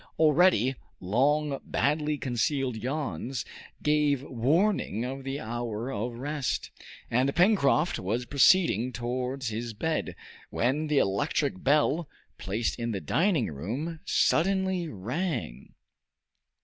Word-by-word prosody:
Already, 155 - +4 0.3
long 140 +8 +1
badly 150 +1 0
concealed 130 0 -1
yawns 125 - -3 0.4
gave 150 -3 +2
warning 140 - +1
of 135 +1 -5
the 135 +1 -4
hour 120 +1 -4
of 115 +2 -3
rest, 145 +2 -3 0.4
and 130 +4 +2
Pencroft 175 -5 +3
was 115 +7 -2
proceeding 140 - +4
towards 125 +1 -3
his 115 +1 -5
bed, 160 +8 -2 0.3
when 145 +6 0
the 150 -1 +1
electric 95 -3 0
bell, 150 +2 +2 0.3
placed 110 +5 -2
in 115 0 -2
the 105 -4 -2
dining 165 - +1
room, 125 - -4
suddenly 190 0 +1
rang. 125 - -4
135 Hz, 110 wpm, -28 LUFS, 115-150 Hz, 0.4 s, Already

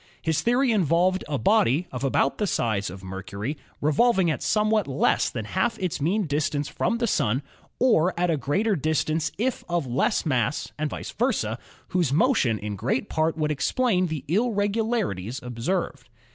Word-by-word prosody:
His 160 -2 0
theory 245 +2 +2
involved 185 -1 +2
a 145 - 0
body 180 - +3
of 125 0 -5
about 135 0 +1
the 210 - +1
size 110 - 0
of 95 +2 -10
Mercury 100 +7 -5 0.3
revolving 180 +4 +3
at 145 - -3
somewhat 215 -3 +2
less 135 0 +2
than 110 -4 -5
half 225 - 0
its 180 -7 -3
mean 195 +7 +1
distance 145 -1 -1
from 235 - -1
the 235 - 0
Sun, 130 - +1 0.4
or 185 -9 +3
at 175 -1 +2
a - - +2
greater 195 +10 0
distance 155 0 0
if 245 +4 -1
of 170 -3 0
less 125 +6 0
mass 135 -1 0
and 155 0 0
vice - - -6
versa, - - -1 0.3
whose 175 -7 +1
motion 150 - +3
in 105 0 -5
great 125 +6 -1
part 160 +1 0
would 155 -1 0
explain 185 - +1
the 155 -4 -5
irregulari 215 - 0
ties 120 +5 -5
observed. 125 +2 -3
160 Hz, 170 wpm, -25 LUFS, 135-205 Hz, 0.4 s, body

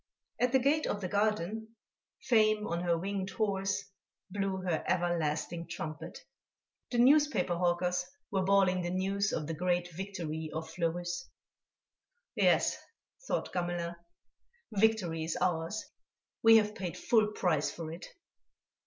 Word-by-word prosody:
At 250 0 +2
the 265 - +5
gate 285 +4 +2
of 205 - -1
the 190 - -3
garden, 215 +2 -1 0.5
Fame 215 -4 +3
on 170 -3 -2
her 170 -1 +1
winged 190 +2 -3
horse 195 -1 -1 0.5
blew 195 -1 -1
her 175 -4 0
everlasting 170 -1 0
trumpet. 155 0 -6 0.7
The 245 - -2
newspaper 290 -5 +4
hawkers 180 +1 +1 0.3
were 195 -2 +1
bawling 190 -1 +3
the 175 - -2
news 195 +2 0
of 155 - -2
the 165 - -3
great 175 +1 0
victory 160 -4 -4
of 160 0 -3
Fleurus. 175 +4 -2 1.0
"Yes," - - +3 0.5
thought - - -2
Gamelin, 175 -1 -2 0.8
"victory 200 -6 +2
is 160 0 -2
ours. 175 +4 -1 0.6
We 225 0 +8
have 210 -1 +2
paid 185 -5 -5
full 220 -3 +3
price 160 -7 +1
for 160 -2 -6
it." 170 - -8
185 Hz, 130 wpm, -31 LUFS, 170-210 Hz, 1.0 s, We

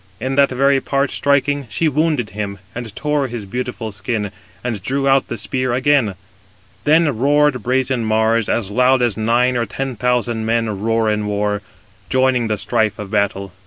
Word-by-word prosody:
In 130 +1 -2
that 140 0 +4
very 135 +1 +2
part 140 +1 0
striking, 140 -1 +1
she 160 +11 0
wounded 150 -6 0
him, 100 -1 -4 0.2
and 115 -3 -7
tore 150 -2 0
his 115 -4 -6
beautiful 120 +1 -4
skin, 105 +1 -3 0.3
and 115 -5 -3
drew 135 +6 -1
out 135 0 +3
the 115 - -4
spear 130 +3 -2
again. 130 -5 +2 0.7
Then 155 -2 +4
roared 145 -1 +3
brazen 130 +1 0
Mars, 110 0 +1
as 105 -4 0
loud 125 +2 +3
as 120 -5 +1
nine 120 +3 +2
or 120 -2 0
ten 135 +4 -4
thousand 120 -1 0
men 110 -3 -1
roar 115 0 +1
in 105 0 -1
war, 105 0 -1 0.5
joining 130 -2 +2
the 105 -1 -1
strife 110 -1 0
of 105 -1 -7
battle. 100 -2 -1
120 Hz, 170 wpm, -19 LUFS, 110-135 Hz, 0.7 s, that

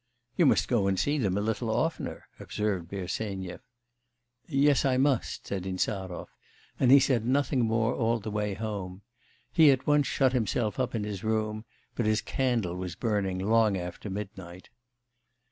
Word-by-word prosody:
'You 170 - +4
must - - +3
go 110 -6 +2
and 95 -1 +1
see 145 +1 +1
them 100 -6 0
a - - 0
little 110 +2 -1
oftener,' 140 +9 -2
observed 100 -5 -2
Bersenyev. 95 -1 -4 0.9
'Yes, 140 -1 +3
I 130 -2 +2
must,' 135 -2 0
said 95 -2 -3
Insarov; 95 -1 -3 0.5
and 130 - +3
he 140 +2 +9
said 130 -4 +2
nothing 130 0 +1
more 115 +1 +1
all 115 0 +1
the 110 0 -6
way 105 -1 -1
home. 100 -3 -5 0.5
He 160 +1 +6
at 135 -1 +2
once 145 -1 +3
shut 130 -2 +2
himself 110 -3 0
up 130 -2 -1
in 110 - -1
his 105 -3 -5
room, 110 0 -1 0.3
but 120 - -1
his 110 0 +1
candle 120 -9 0
was 90 -2 -5
burning 100 -3 -1
long 105 +1 +3
after 90 +3 -6
midnight. 95 -3 -8
110 Hz, 160 wpm, -28 LUFS, 95-125 Hz, 0.9 s, he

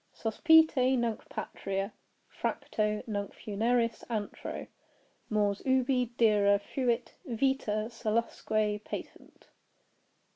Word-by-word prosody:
Sospite 320 +7 +4 0.2
nunc 235 -2 -2
patria, 195 +1 -4 0.3
fracto 210 -1 -2
nunc 205 -3 -4
funeris 230 +2 0
antro, 215 -3 -4 0.6
Mors 205 -2 +1
ubi 260 -1 +2
dira 205 -3 +5
fuit 240 +3 -1
vita 230 -3 0
salusque 215 -2 -1
patent. - - -9
220 Hz, 80 wpm, -30 LUFS, 210-245 Hz, 0.6 s, dira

